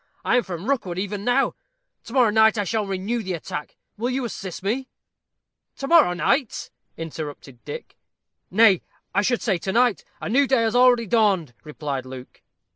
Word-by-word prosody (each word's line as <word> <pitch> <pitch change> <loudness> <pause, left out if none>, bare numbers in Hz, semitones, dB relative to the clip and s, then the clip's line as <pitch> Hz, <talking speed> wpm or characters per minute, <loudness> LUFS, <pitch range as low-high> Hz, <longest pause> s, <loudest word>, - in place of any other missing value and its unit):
I - - +3
am - - +4
from 185 -1 -7
Rookwood 215 -11 -1
even 200 +1 -3
now. 245 +4 +2 0.5
To 230 - -10
morrow 250 -5 +4
night 220 +1 +5
I 205 - +1
shall 215 +1 -1
renew 195 +5 -2
the 190 -3 -4
attack. 150 -2 -6 0.2
Will 235 +4 -1
you 255 0 -1
assist 190 -5 -6
me?" 255 +6 -2 0.9
"To 275 - -4
morrow 325 - +6
night!" 255 - 0 0.3
interrupted 145 -6 -7
Dick. - - -8 0.5
"Nay, 200 -2 +5 0.3
I 200 - +3
should 240 +3 0
say 195 -6 +1
to 190 - -3
night. 240 0 +2 0.2
A - - -5
new 270 +6 +3
day 260 -3 +3
has 225 +1 0
already 245 -1 +5
dawned," 195 - +2
replied 145 -4 -5
Luke. 130 -1 -10
210 Hz, 175 wpm, -23 LUFS, 180-245 Hz, 0.9 s, morrow